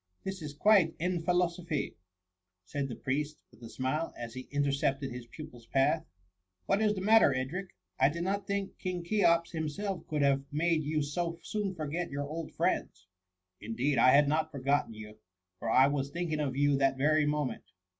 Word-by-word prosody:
" 90 - -45
This 190 -1 -4
is 150 -2 -6
quite 190 -1 +4
en 175 +1 0
philosopher'* 170 -3 0 0.7
said 140 +8 -3
the 120 - -6
priest 150 +3 -2
with - - -21
a 115 - -9
smile, 150 +7 -2
as 120 -1 -6
he 130 0 -8
intercepted 140 -1 0
his 120 -1 -8
pupil's 120 -4 -11
path. 140 +4 +2 0.6
What 200 - +2
is 210 -1 +2
the 190 - -4
matter, 210 -9 +5
Edric? 155 +10 -3 0.3
I 135 - +5
did 170 +3 -4
not 195 +2 -2
think 200 -1 -3
King 180 -2 -3
Cheops 170 -3 +2
himself 170 +5 -3
could 150 -2 0
have 140 -1 +3
made 160 +2 +1
you 155 0 -1
so 165 +4 -2
soon 205 -3 -2
forget 160 +2 -3
your 140 +1 -3
old 160 +1 -5
friends. 165 - -1 0.6
^^ - - -13
Indeed 120 +5 0
I 130 - +7
had 145 +2 +6
not 155 +2 +1
forgotten 140 -4 0
you, 105 0 -10 0.4
for 115 - -3
I 130 +3 +6
was 140 -1 0
thinking 165 0 -2
of 140 -4 -1
you 145 0 +3
that 135 -1 +2
very 150 +2 +3
moment. 145 -5 -2
150 Hz, 185 wpm, -31 LUFS, 135-170 Hz, 0.7 s, I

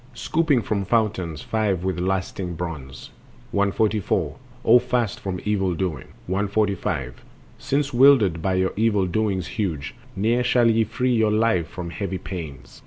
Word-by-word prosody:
Scooping 150 -2 +1
from 100 -2 -1
fountains 95 -7 0
five 105 -5 0
with 95 -2 -1
lasting 95 -1 -2
bronze. 70 -7 -7 0.4
144. 100 +1 0 0.3
O 125 - +7
fast 125 -3 -1
from 95 -2 -4
evil 95 -4 0
doing. 80 -7 -3 0.2
145. 100 - -1 0.4
Since 140 0 -1
wildered 120 -10 +5
by 95 +1 0
your 95 0 +1
evil 105 -3 +2
doings 95 -1 -1
huge, 85 - -3 0.2
Ne'er 115 +5 +1
shall 120 -1 +4
ye 115 0 +3
free 125 +4 0
your 110 -2 +3
life 105 -6 +2
from 85 -2 -7
heavy 95 0 -3
pains. 80 -9 -8
100 Hz, 140 wpm, -23 LUFS, 90-110 Hz, 0.4 s, O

